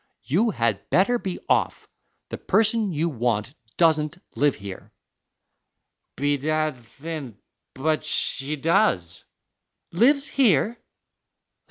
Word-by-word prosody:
You 200 - +1
had 115 - -1
better 240 +6 +3
be 190 -5 -4
off; - - 0 0.4
the - - -6
person 220 -2 +2
you 160 +1 0
want 120 -4 -1 0.2
doesn't 160 -1 +2 0.2
live 145 +3 +2
here." 100 -2 -9 1.2
"Bedad, 145 -1 -1
thin, 140 -1 -8 0.4
but 155 +3 0
she 140 +2 -2
does." 135 - +1 0.7
"Lives 275 - +3
here?" 225 - +2
155 Hz, 95 wpm, -24 LUFS, 130-195 Hz, 1.2 s, better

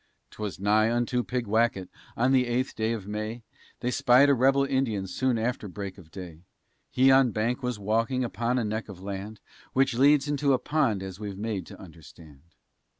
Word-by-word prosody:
'Twas 105 -3 -6
nigh 105 +2 +3
unto 120 +1 0
Pigwacket, 115 -5 0 0.3
on 130 +3 +2
the 130 -2 +3
eighth 125 +2 -1
day 110 0 -1
of 110 -5 -4
May, 110 +3 -5 0.4
They 125 - -1
spied 125 +3 +5
a - - +6
rebel 135 +2 +3
Indian 130 -8 -1
soon 125 +5 0
after 115 -1 -2
break 100 0 -7
of 80 -4 -16
day; 85 -3 -10 0.5
He 130 +1 +4
on 135 -1 +6
a - - -3
bank 115 +5 -1
was 125 -3 -2
walking, 115 +5 0
upon 120 +2 -1
a 125 - +1
neck 110 +1 -3
of 95 -2 -10
land, 100 +2 -6 0.3
Which 135 -1 +2
leads 140 +3 +4
into 145 -1 +1
a - - +4
pond 125 -9 0
as 95 0 -8
we're 105 -2 -5
made 100 -3 -4
to - - -12
understand. 80 -4 -14
115 Hz, 190 wpm, -27 LUFS, 100-130 Hz, 0.5 s, a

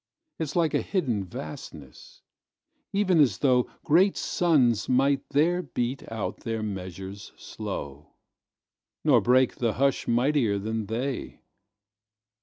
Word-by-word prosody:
It's 155 -3 -3
like 165 -3 +2
a - - +2
hidden 130 - -1
vastness, 90 - -10 0.7
even 195 -4 +2
as 140 -5 +4
thoughGreat 150 +8 +2
suns 130 - +2
might 135 +2 +2
there 170 +5 +2
beat 125 -5 -4
out 110 -3 -3
their 115 -2 -3
measures 95 0 -6
slow, 75 -9 -7 0.9
Nor - - +5
break 130 +1 +3
the 115 -3 0
hush 135 +1 +1
mightier 120 -3 +2
than 110 +1 -3
they. 125 +5 -4
125 Hz, 110 wpm, -26 LUFS, 105-145 Hz, 0.9 s, Nor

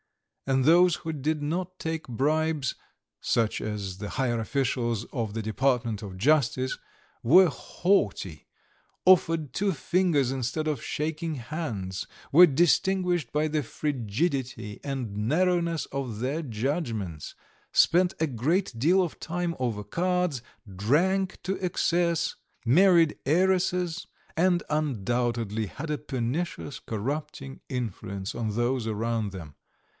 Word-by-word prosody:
And 135 -1 +2
those 175 +2 +6
who 160 - -5
did 150 +1 -1
not 180 +4 -3
take 160 0 -3
bribes, 150 +3 0 0.5
such 115 -2 +1
as 100 -3 -4
the 105 0 -5
higher 125 -3 0
officials 120 -2 -1
of 115 -5 -2
the 115 - -2
Department 115 -1 0
of 95 -3 -7
Justice, 130 +1 +2 0.5
were 180 +10 +7
haughty, 105 - -1 0.6
offered 165 -5 +4
two 200 +1 +1
fingers 165 -5 +1
instead 135 +4 -2
of 150 -6 -2
shaking 155 +1 -2
hands, 115 - -4 0.3
were 175 +4 +9
distinguished 175 -1 +2
by 150 +1 +1
the 155 0 0
frigidity 125 - -2
and 130 -7 -4
narrowness 170 - +1
of 125 -6 -5
their 135 +7 -1
judgments, 115 - -3 0.4
spent 180 +1 +4
a 160 - +2
great 145 - 0
deal 175 +10 +4
of 170 - -5
time 175 0 -2
over 115 -5 -2
cards, 180 -6 0 0.3
drank 180 - +1
to 190 +1 -3
excess, 170 -1 +1 0.3
married 170 +4 +5
heiresses, 180 +1 +1 0.3
and 175 +1 +2
undoubtedly 120 -6 -1
had 150 +9 -6
a 150 - 0
pernicious 140 +1 -3
corrupting 135 +4 -5
influence 100 -6 -4
on 110 -3 -2
those 120 0 0
around 110 -1 -1
them. 80 -7 -9
140 Hz, 120 wpm, -27 LUFS, 115-170 Hz, 0.6 s, were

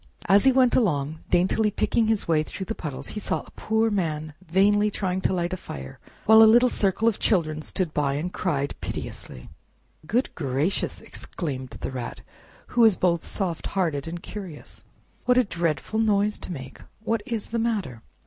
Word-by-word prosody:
As 200 +6 +5
he 265 - +7
went 255 -1 +4
along, 155 - +1
daintily 190 +5 +3
picking 220 +2 +1
his 220 -2 +1
way 160 -2 +3
through 190 +5 -6
the 225 - -3
puddles, 150 -10 -6
he 210 - -4
Saw - - -1
a - - -16
Poor 220 +1 0
Man 155 -6 -2
vainly 205 +4 +3
trying 190 -2 -2
to - - +1
light 175 -1 -1
a - - -2
fire, 65 - -9 0.3
while 220 +1 +8
a 220 - +9
little 240 +3 +6
circle 210 +1 +1
of 225 - +2
children 155 -6 +1
stood 165 0 -2
by, 140 -2 +1
and 170 +5 -3
cried 140 -6 -1
piteously. 60 - -6 0.6
"Goodness 245 - +1
gracious!" 145 +4 -1
exclaimed 130 -6 -4
the - - -3
Rat, 125 -2 -6 0.5
who 240 - +2
was 220 -5 +6
both 170 -2 +1
soft 180 -5 -3
hearted 160 -7 0
and 170 +1 -6
curious, 185 -8 -9 0.4
"What 250 0 +4
a 255 - +6
dreadful 170 - -2
noise 210 -1 +2
to - - -7
make! 135 -6 -8 0.2
What 225 -1 0
is 225 -3 -3
the 230 - 0
matter?" 200 - -2
185 Hz, 180 wpm, -25 LUFS, 155-220 Hz, 0.6 s, a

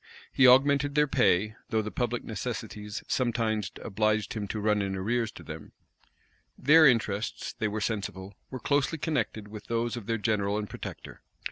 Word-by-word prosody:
He 130 - +6
augmented 140 +2 +5
their 150 0 +5
pay; 110 -7 +2
though 110 -1 +1
the 105 - -5
public 120 -1 -2
necessities 110 -2 -5
sometimes 115 -5 0
obliged 110 +2 0
him 105 -3 -4
to 105 - -4
run 105 0 +2
in 95 -1 -2
arrears 115 +4 -1
to - - -11
them. - - -9 0.8
Their 155 +3 +7
interests, 115 -4 0
they 110 - -2
were 105 +1 -3
sensible, 100 -2 -3 0.2
were 130 - -6
closely 145 +5 +1
connected 140 -9 -2
with 105 0 -9
those 115 0 -1
of 115 -4 -7
their 115 -1 0
general 105 -1 0
and 105 -1 -3
protector. - - -8
110 Hz, 165 wpm, -28 LUFS, 105-125 Hz, 0.8 s, Their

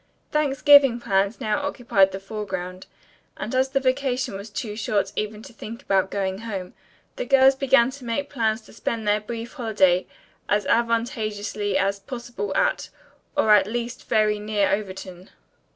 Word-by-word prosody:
Thanksgiving 285 -3 +5
plans 195 0 0
now 215 +6 -1
occupied 235 -9 +2
the 190 - -5
foreground, 190 -3 -6 0.5
and 225 - -5
as 260 +1 +2
the 275 0 +1
vacation 260 -3 0
was 200 +3 -7
too 210 0 -5
short 205 -2 -1
even 215 0 -3
to - - -12
think 230 +1 -9
about 190 -1 +1
going 190 -1 -2
home, 195 -5 -6 0.4
the - - -2
girls 270 0 +6
began 265 -2 +3
to 265 -2 -11
make 260 +5 -2
plans 225 -4 -1
to - - -17
spend 225 -1 -3
their 210 +1 +2
brief 230 +2 -6
holiday 205 -9 +2 0.4
as 205 -1 +2
advantageously 215 -3 0
as 195 +1 0
possible 235 -2 -6
at - - +1 0.5
or 215 - +4
at 205 -1 +5
least 240 +2 -5
very 210 -1 +2
near 210 -1 0
Overton. 190 -2 -5
215 Hz, 155 wpm, -24 LUFS, 200-245 Hz, 0.5 s, girls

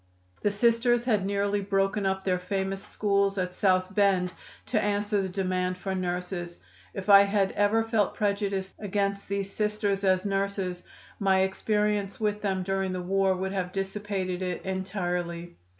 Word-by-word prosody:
The 205 - +2
Sisters 235 +3 +2
had 210 -6 +1
nearly 200 0 0
broken 195 0 +1
up 190 0 -1
their 180 -1 +1
famous 195 +1 -2
schools 200 -1 +1
at 180 -1 -1
South 185 -1 +2
Bend 190 -3 +2 0.3
to 215 -4 +1
answer 205 0 0
the 190 - -3
demand 185 -1 -1
for 190 +1 -3
nurses. 180 -1 -3 0.4
If 190 - -5
I 200 -1 +9
had 200 -1 +1
ever 205 +2 +2
felt 225 -2 +1
prejudiced 200 -2 -1
against 200 -1 -1
these 200 0 -3
Sisters 210 -2 0
as 185 0 +2
nurses, 195 -2 -1 0.4
my 190 -1 +3
experience 210 +1 0
with 210 -1 0
them 190 -2 -1
during 195 0 -1
the 185 - -2
war 190 +1 +2
would 190 +1 -3
have 185 -2 -2
dissipated 195 -1 -3
it 180 -1 -3
entirely. 180 -3 -3
195 Hz, 155 wpm, -27 LUFS, 185-205 Hz, 0.4 s, I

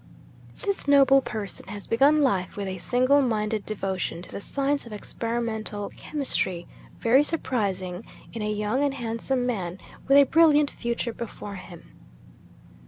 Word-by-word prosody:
'This 400 -7 -2
noble 275 -1 +6
person 210 -6 -6
has 205 -1 -7
begun 285 +6 +4
life 195 -9 0
with 200 -1 -3
a 185 -1 -4
single 255 +8 +3
minded 215 -4 0
devotion 190 -5 -3
to 175 - -11
the - - -6
science 280 +2 -1
of - - -11
experimental 220 -1 -3
chemistry, 190 - -2 0.3
very 245 +4 +5
surprising 200 - -2 0.3
in 225 - -5
a 210 0 -1
young 210 +6 0
and 280 -1 0
handsome 245 +1 -2
man 190 -7 -2 0.3
with 275 +1 +6
a 285 - +9
brilliant 300 0 +4
future 235 0 -3
before 210 -3 -7
him. 175 -2 -12
230 Hz, 145 wpm, -26 LUFS, 200-275 Hz, 0.3 s, a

